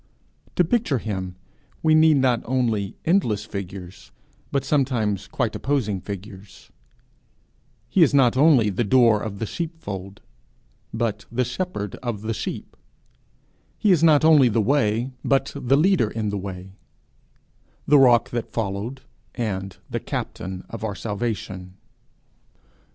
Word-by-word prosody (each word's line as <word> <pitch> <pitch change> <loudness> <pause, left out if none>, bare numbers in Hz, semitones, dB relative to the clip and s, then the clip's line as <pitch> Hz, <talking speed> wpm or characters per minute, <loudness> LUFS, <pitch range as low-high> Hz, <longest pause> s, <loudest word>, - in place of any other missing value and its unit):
To 180 - +4
picture 175 - +1
him, 95 -5 -4 0.5
we 160 -1 +4
need 155 -1 +6
not 125 -3 +2
only 115 -6 -1
endless 115 - +1
figures, 95 -3 -8 0.4
but 135 -1 0
sometimes 125 -9 0
quite 120 -5 -2
opposing 115 -9 -1
figures: 100 0 -10 1.2
he 180 +10 +2
is 160 - +6
not 130 -4 +4
only 130 -7 +5
the 100 - 0
door 115 -1 +4
of 105 -2 -5
the 115 - -3
sheepfold, 105 - -6 0.7
but 115 -2 -2
the 125 +2 0
shepherd 125 - -4
of 115 -4 -4
the 115 +1 -2
sheep; - - -6 1.0
he 210 - +3
is 165 -3 +3
not 155 -2 +5
only 150 -6 +6
the 115 - +1
way, 115 0 +1
but 135 -1 +1
the 135 -1 +2
leader 175 - +3
in 110 -2 -3
the 100 - -3
way, 95 -1 -7 1.1
the 145 -1 +6
rock 120 -3 +5
that 120 -1 -4
followed, 110 +4 -3 0.3
and 95 -5 -3
the - - -3
captain 95 0 -5
of 115 - -8
our 105 -2 -3
salvation. 100 -4 -4
115 Hz, 135 wpm, -23 LUFS, 100-135 Hz, 1.2 s, need